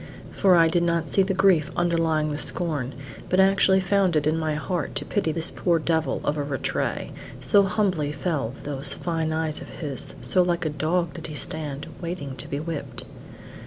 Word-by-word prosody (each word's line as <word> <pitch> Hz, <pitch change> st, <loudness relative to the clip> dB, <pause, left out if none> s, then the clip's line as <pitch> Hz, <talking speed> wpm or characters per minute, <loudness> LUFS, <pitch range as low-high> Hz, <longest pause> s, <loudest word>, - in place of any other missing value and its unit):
For 190 Hz, -2 st, +4 dB
I 165 Hz, -1 st, +6 dB
did 170 Hz, +1 st, +1 dB
not 170 Hz, -1 st, 0 dB
see 195 Hz, -, +3 dB
the 190 Hz, 0 st, 0 dB
grief 180 Hz, -6 st, +4 dB
underlying 165 Hz, -3 st, +1 dB
the 145 Hz, -, -3 dB
scorn, 150 Hz, -8 st, -1 dB, 0.4 s
but 185 Hz, -, +2 dB
actually 190 Hz, 0 st, +5 dB
found 190 Hz, -2 st, +2 dB
it 150 Hz, -1 st, +2 dB
in 155 Hz, +1 st, +2 dB
my 160 Hz, -2 st, -1 dB
heart 170 Hz, +4 st, -3 dB
to -, -, -2 dB
pity 200 Hz, -6 st, 0 dB
this 165 Hz, +1 st, 0 dB
poor 170 Hz, -2 st, +1 dB
devil 160 Hz, 0 st, 0 dB
of 150 Hz, -, 0 dB
a 145 Hz, -, -1 dB
Rattray: 140 Hz, -2 st, -2 dB, 0.3 s
so 205 Hz, -, +4 dB
humbly 180 Hz, -6 st, 0 dB
fell 145 Hz, -5 st, -2 dB
those 140 Hz, 0 st, +3 dB
fine 165 Hz, -2 st, -2 dB
eyes 160 Hz, -1 st, -2 dB
of -, -, -9 dB
his, 145 Hz, -5 st, -5 dB
so 185 Hz, -, +3 dB
like 175 Hz, -1 st, 0 dB
a -, -, +1 dB
dog 160 Hz, +3 st, -1 dB
did 165 Hz, -, -6 dB
he 155 Hz, -, -7 dB
stand, 150 Hz, -1 st, -4 dB, 0.2 s
waiting 170 Hz, -6 st, -5 dB
to -, -, -6 dB
be 140 Hz, -, -3 dB
whipped. 160 Hz, -1 st, -5 dB
165 Hz, 195 wpm, -25 LUFS, 150-180 Hz, 0.4 s, I